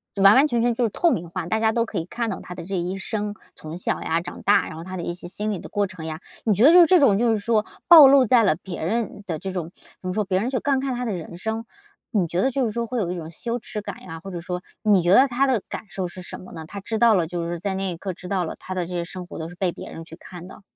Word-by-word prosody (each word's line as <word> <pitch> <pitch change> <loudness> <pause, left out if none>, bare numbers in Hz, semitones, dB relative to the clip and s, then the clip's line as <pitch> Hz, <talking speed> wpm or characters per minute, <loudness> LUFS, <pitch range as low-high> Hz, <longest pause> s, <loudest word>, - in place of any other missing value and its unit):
完 195 +2 +7
完 280 +3 +6
全 235 -4 0
全 240 0 +2
就 245 - 0
是 230 - +2
透 340 - +2
明 170 -1 -2
化， 165 - -4
大 220 +4 0
家 220 0 +3
都 230 +1 +1
可 - - -6
以 165 - -2
看 230 +4 -3
到 - - -4
他 180 - -8
的 - - -8
这 195 +2 -4
一 180 +2 -2
生。 210 +1 -3 0.2
从 155 +2 -8
小 180 - -2
呀、 165 +1 0
长 - - -8
大， - - +4
然 155 - -8
后 165 - -7
他 185 +1 -6
的 170 - -4
一 175 - -3
些 175 0 -10
心 210 +4 -3
理 195 - -3
的 - - -10
过 205 -1 0
程 175 -4 -9
呀。 160 0 -5 0.2
你 220 - +3
觉 210 +6 +4
得 320 - +8
就 355 -1 +9
这 365 0 +5
种 210 -9 +5
就 235 0 +2
是 220 - +1
说 215 0 +1 0.2
暴 320 -5 +11
露 270 -1 +6
在 235 0 +5
了 175 -6 +3
别 175 -2 -7
人 220 0 -2
的 165 -5 -3
这 190 - -5
种 175 -2 -4 0.3
怎 185 - -6
么 180 - -1
说 215 +1 0
别 185 -1 +1
人 235 +6 -1
就 255 - -1
观看 270 -2 0
他 245 0 -3
的 220 - -1
人 170 -1 -7
生。 220 +3 -3 0.5
你 200 -6 +2
觉 175 +3 -1
得 265 - +3
就 265 +1 0
是 220 - -1
说 235 +1 -3
会 250 -1 -2
有 180 -4 -1
一 - - -3
种 160 -1 -7
羞 235 +8 -4
耻 210 -1 -6
感 200 -2 -8
呀， 165 0 -8
或 195 0 -8
者 175 - -5
说 180 +1 -5 0.2
你 205 -4 +4
觉 175 +2 +4
得 260 +7 +7
他 265 +2 +1
的 245 -7 +1
感 - - -5
受 185 -2 -3
是 185 +1 -10
什 - - -8
么 185 - -12
呢？ 160 -2 -7
他 200 - -7
知 220 +3 -3
道 235 -2 +6
了 170 -4 +1
就 170 0 -3
是 170 -1 -4
在 195 +1 -2
那 190 -1 -2
一 - - -9
刻， 190 +1 -4
知 180 +1 -11
道 185 -1 0
了 - - -5
他 185 - -6
的 180 -2 -2
这 180 - -7
些 170 -1 -2
生 180 +1 -8
活 - - -9
都 160 - -4
是 175 - -12
被 180 -1 0
别 - - -9
人 165 - -8
去 165 - -11
看 180 0 -11
的。 200 - -13
195 Hz, 355 characters per minute, -23 LUFS, 175-230 Hz, 0.5 s, 暴